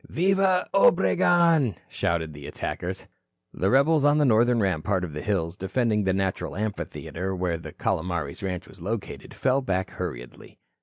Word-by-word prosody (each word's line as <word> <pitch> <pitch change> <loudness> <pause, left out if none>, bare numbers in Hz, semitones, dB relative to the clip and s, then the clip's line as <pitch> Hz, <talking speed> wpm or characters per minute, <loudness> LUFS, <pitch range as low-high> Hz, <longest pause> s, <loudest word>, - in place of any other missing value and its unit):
"Viva, 190 +1 +2
Obregon," 170 - +4
shouted 80 -2 -2
the 70 -1 -9
attackers. - - -5 0.5
The 95 - 0
rebels 140 +3 +4
on 145 +1 +4
the 150 - +3
northern 120 0 +4
rampart 95 -1 0
of 85 -4 -5
hills 85 0 -1
defending 105 +2 0
the 95 - +2
natural 95 0 -2
amphitheatre 95 -2 -4
where 90 -2 -1
the - - -9
Calomares 85 -4 -2
ranch 90 -2 -4
was 95 - -15
located, 105 +4 -5
fell 130 +1 +1
back 95 -6 -2
hurriedly. 60 -10 -7
95 Hz, 145 wpm, -25 LUFS, 90-135 Hz, 0.5 s, Obregon